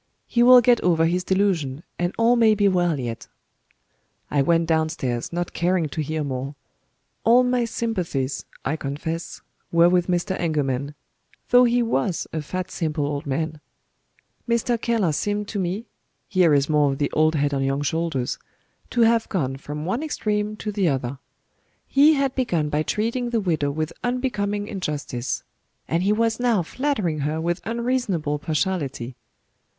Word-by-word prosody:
He 235 - +1
will 250 +1 +9
get 240 0 +4
over 165 -2 +3
his 180 +2 +1
delusion, 175 -8 0 0.2
and 175 0 0
all 230 +1 +4
may 225 -2 +5
be 205 -1 +3
well 175 -5 +2
yet." 120 -3 -5 1.0
I 145 - +3
went 165 +4 +3
downstairs, 160 -7 -1
not 175 0 -3
caring 175 -2 +1
to 155 - -3
hear 155 +1 -2
more. 135 +1 -4 0.7
All 240 +2 +6
my 250 -1 +1
sympathies, 175 - -2 0.2
I 155 +4 0
confess, 160 +4 -5 0.3
were 170 +1 +5
with 180 -1 +2
Mr. 180 +1 0
Engelman 145 -4 -1 0.5
though 250 0 +7
he 240 0 +2
was 170 - 0
a 160 - -2
fat 185 +4 -5
simple 155 -3 -1
old 145 +1 -3
man. 155 +2 -2 0.9
Mr. 235 0 +1
Keller 225 -8 +1
seemed 205 +6 -1
to 205 - -3
me 190 +5 -2 0.4
(here 180 -4 +3
is 140 0 +2
more 150 -2 +3
of - - -5
the 145 0 -1
"old 155 +1 +2
head 145 -1 +1
on 135 -1 0
young 135 +1 0
shoulders!") 155 -4 -1 0.5
to 240 - 0
have 230 0 +3
gone 135 -9 -1
from 150 +2 -6
one 230 - -1
extreme 210 -8 -1
to 210 0 -4
the 200 -3 +1
other. 135 -2 -1 0.7
He 295 +3 +5
had 275 -2 0
begun 175 - 0
by 150 +1 0
treating 230 +8 -1
the 235 -1 +1
widow 160 -8 0
with 155 +2 -3
unbecoming 210 -5 -1
injustice; 150 - -3 0.4
and 165 +2 0
he 195 +3 +2
was 225 +1 +1
now 235 -7 +2
flattering 210 - -1
her 150 +3 -1
with 170 +2 -1
unreasonable 230 - -1
partiality. 145 -6 -2
175 Hz, 160 wpm, -23 LUFS, 150-220 Hz, 1.0 s, will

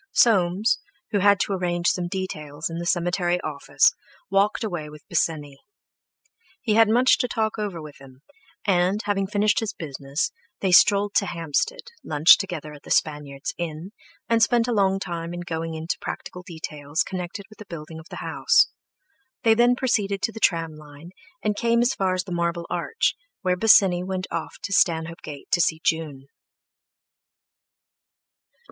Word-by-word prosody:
Soames, 195 -2 +3 0.3
who 205 - +2
had 200 0 +5
to 200 - 0
arrange 175 -2 0
some 175 -1 -1
details 160 -5 -4
in 165 - -4
the 170 - -4
cemetery 175 0 +1
office, 145 -2 +2 0.4
walked 200 +3 +2
away 175 -8 -4
with 150 -1 -14
Bosinney. 145 -4 -1 1.0
He 225 -9 0
had 225 0 +5
much 245 +4 +4
to 250 - +1
talk 220 -2 -2
over 200 -5 -3
with 150 -2 -10
him, 135 0 -16 0.4
and, 185 0 +2
having 195 -1 0
finished 210 +1 +2
his 220 -2 -3
business, 140 -1 -3 0.3
they 190 - 0
strolled 200 +3 +5
to 200 - +2
Hampstead, 165 - -2 0.2
lunched 155 +3 +6
together 160 -6 -5
at 145 - -12
the - - -14
Spaniard's 145 -3 -1
Inn, 170 +2 -5 0.4
and 230 -1 +2
spent 235 +1 +3
a 245 - 0
long 195 -2 +2
time 170 -2 -5
in 175 - -5
going 165 -1 -4
into 160 +2 -3
practical 180 - -6
details 155 -4 -3
connected 185 +2 -6
with 215 - -18
the 210 - -11
building 160 -1 -8
of 160 - -14
the - - -7
house; - - +3 0.7
they 225 - +6
then 240 +2 +4
proceeded 205 -6 0
to - - +1
the 225 - -9
tram 165 -5 +1
line, 150 +2 -13 0.3
and 210 -1 0
came 235 +2 +2
as 245 - +2
far 190 -1 0
as 185 - -1
the 190 - -10
Marble 170 0 -1
Arch, 180 - 0 0.3
where 180 -1 +2
Bosinney 185 -3 +5
went 185 0 -3
off - - -4
to 200 -1 -3
Stanhope 165 -3 +1
Gate 145 -2 -10
to 175 - +3
see 160 -1 +1
June. 150 -4 -1
175 Hz, 165 wpm, -24 LUFS, 160-205 Hz, 1.0 s, lunched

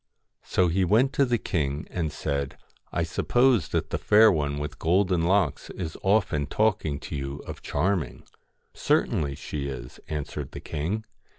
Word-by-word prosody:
So 90 - +1
he 90 +3 +1
went 115 +9 +3
to 140 - +3
the 120 -2 +1
king 75 -7 -2
and 80 -4 -2
said: 70 -2 -3 0.2
' - - -33
I 85 - 0
suppose 120 - +2
that - - -2
the - - -1
Fair 110 +1 +6
One 75 -4 -1
with 75 -1 -5
Golden 90 +1 +2
Locks 90 -3 +1
is 80 -4 -5
often 95 -8 +2
talking 95 -9 +1
to - - -6
you 70 0 -3
of - - -8
Charming.' 90 -8 -1 0.3
* - - -46 0.2
Certainly 70 -2 +2
she 70 0 -4
is,' 60 -3 -7
answered 75 -2 -5
the - - -6
king. 85 +9 -3
80 Hz, 170 wpm, -26 LUFS, 70-100 Hz, 0.3 s, Fair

